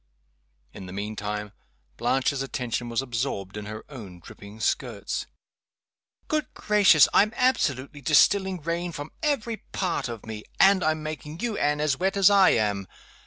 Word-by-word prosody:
In 95 - -9
the 90 - -9
mean 105 +2 -4
time 105 0 -4 0.5
Blanche's 135 +1 0
attention 125 -3 -3
was 115 +3 -1
absorbed 115 -6 -3
in 105 -1 -6
her 110 +1 -7
own 105 -11 -10
dripping 100 +4 -13
skirts. 110 - -2 1.0
"Good 305 -3 -1
gracious! 200 -8 +5
I'm 210 +1 +5
absolutely 145 - 0
distilling 185 +5 +3
rain 170 +1 -2
from 145 +1 -7
every 255 -7 -1 0.2
part 180 -9 -1
of 115 -3 -7
me. 110 -1 -7 0.2
And 195 -1 +5
I'm 155 0 0
making 155 +1 -6
you, 235 -3 -1
Anne, 150 -3 0
as 150 -2 0
wet 190 +2 0
as 195 0 +6
I 195 -2 +6
am! 100 -3 0
145 Hz, 155 wpm, -26 LUFS, -, 1.0 s, as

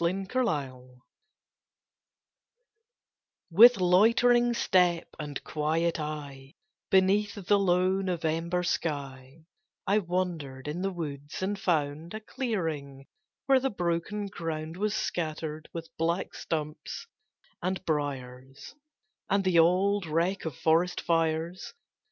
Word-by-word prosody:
IN 185 +3 0
NOVEMBER 135 - -2 2.5
With 235 +8 +8
loitering 230 +6 +4
step 180 -6 +2
and 145 -2 -5
quiet 160 +2 0
eye, 145 -3 -6 0.3
Beneath 195 +2 +3
the 205 +2 +4
low 185 0 +2
November 170 -1 -1
sky, 140 -3 -4 0.4
I 200 +2 +3
wandered 170 -8 -3
in 155 +4 -3
the 195 - 0
woods, 150 -3 -6
and 200 +1 -2
found 160 +1 -1
A - - -4
clearing, 165 - -4 0.4
where 270 -1 +5
the 270 +1 0
broken 175 +2 -2
ground 165 -4 -5
Was 210 +3 -1
scattered 155 -2 -3
with 165 -1 -8
black 170 +3 0
stumps 155 - -4 0.6
and 185 +1 -2
briers, 135 -3 -4 0.6
And 200 0 +2
the 185 -3 +3
old 185 +3 +3
wreck 170 +5 0
of 155 -6 -4
forest 170 +3 +2
fires. 165 +1 -1
170 Hz, 110 wpm, -28 LUFS, 150-190 Hz, 2.5 s, With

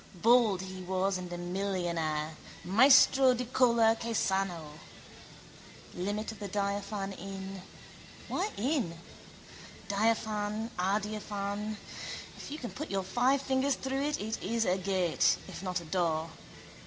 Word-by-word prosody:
Bald 220 -1 +4
he 190 0 -7
was 185 +1 0
and 180 -1 -7
a 175 - -4
millionaire, 175 -4 -2 0.3
maestro 260 +5 +6
di 250 +1 -3
color 235 -2 +4
che 230 0 -4
sanno. 175 -7 -1 1.1
Limit 205 +5 -2
of 220 - -11
the 205 - -4
diaphane 200 0 -2
in. 195 0 -6 0.7
Why 390 +4 -1
in? 235 - 0 0.9
Diaphane, 215 +1 0
adiaphane. 205 +1 -2 0.6
If - - -9
you 295 - -5
can 245 -6 -6
put 305 - -6
your 195 -1 -1
five 250 +8 +2
fingers 265 +1 +1
through 265 +1 -2
it 295 +1 0
it 220 +2 -3
is 225 +3 0
a 185 +1 +1
gate, 185 -3 +2
if - - -8
not 185 -2 -1
a - - -11
door. 160 -1 0
200 Hz, 130 wpm, -31 LUFS, 185-230 Hz, 1.1 s, maestro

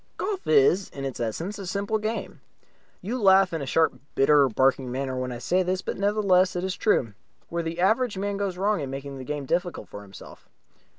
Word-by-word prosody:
Golf 390 0 -3
is 415 - +4
in 135 -1 -7
its 135 - -5
essence 165 - -3
a 195 - -6
simple 200 +3 -1
game. 220 +2 -4 0.6
You 235 +6 -3
laugh 190 -2 +5
in 165 - -2
a 140 - -5
sharp, 160 +4 +2 0.2
bitter, 140 0 +5
barking 130 +2 +1
manner 130 0 -3
when 130 0 -3
I 120 - -5
say 175 +10 +1
this, 185 +1 -1
but - - -3
nevertheless 195 -3 +2
it 175 - -2
is 190 -1 -2
true. 120 - +1 0.4
Where 170 0 -2
the 165 +1 -5
average 220 +3 +2
man 200 +1 -2
goes 195 -3 -2
wrong 205 +1 +1
is 145 - -3
in - - -7
making 135 0 -6
the - - -6
game 145 +1 -4
difficult 175 +5 -2
for 100 - -9
himself. 100 -1 -14
180 Hz, 215 wpm, -25 LUFS, 135-200 Hz, 0.6 s, laugh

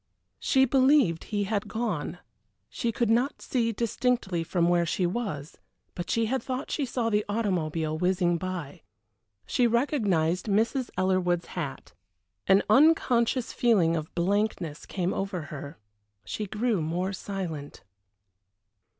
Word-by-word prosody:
She 265 -1 +3
believed 260 - +3
he 205 -1 -1
had 200 0 -2
gone. 210 -8 -3 0.5
She 235 - -2
could 230 0 0
not 245 +5 +1
see 230 -3 0
distinctly 230 -5 0
from 170 +1 +1
where 175 0 +3
she 175 +2 0
was, 175 -7 -4 0.3
but 175 - -6
she 230 0 +2
had 260 +4 -1
thought 260 +2 -4
she 285 -4 -1
saw 235 -2 -1
the 210 0 +2
automobile 165 -7 -1
whizzing 180 -1 +2
by. 180 -6 -5 0.6
She 245 - +2
recognized 210 - +1
Mrs. 225 +5 +1
Ellerwood's 185 -2 +1
hat. 150 -7 -5 0.5
An 195 +1 +5
unconscious 255 -2 +3
feeling 190 -9 +3
of 155 -1 -5
blankness 180 -3 -1
came 185 -1 -1
over 195 -2 -2
her. 145 +1 -7 0.5
She 210 - -4
grew 215 -1 0
more 175 +5 -2
silent. 180 -8 -6
195 Hz, 130 wpm, -27 LUFS, 175-235 Hz, 0.6 s, An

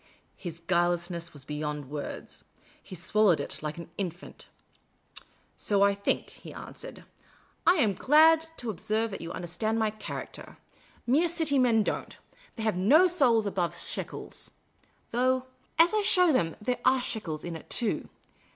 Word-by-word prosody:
His 170 -3 -7
guilelessness 175 -1 0
was 140 -3 -10
beyond 150 -1 -4
words. 150 -1 -6 0.4
He 185 - -10
swallowed 185 0 +3
it 140 - -6
like 150 +1 -4
an 170 0 -9
infant. 175 -2 -6 0.6
" - - -13 0.3
So 200 -1 +2
I 200 0 +4
think," 200 0 -1
he - - -12
answered. - - -10 0.3
" - - -25
I 350 - +7
am 225 - +2
glad 315 - +5
to 240 -2 -3
observe 215 +4 -1
that 195 - -6
you 165 0 -6
understand 185 +6 -2
my 220 -1 +1
character. 215 0 -8 0.5
Mere 305 +8 +3
City 315 -5 +1
men 230 -4 +4
don't. - - -4 0.4
They 225 - -5
have 220 -4 +1
no 280 - +6
souls 265 -11 +3
above 185 -4 -1
shekels. - - -5 0.6
Though, 255 +2 +1 0.3
as 335 +4 +5
I 430 - +3
show 360 -5 +4
them, 165 -10 +1
there 245 +4 -2
are 260 +1 +4
shekels 165 -11 -4
in 170 -1 -5
it, 160 - -11
too. 230 -4 +1
210 Hz, 160 wpm, -28 LUFS, 170-255 Hz, 0.6 s, I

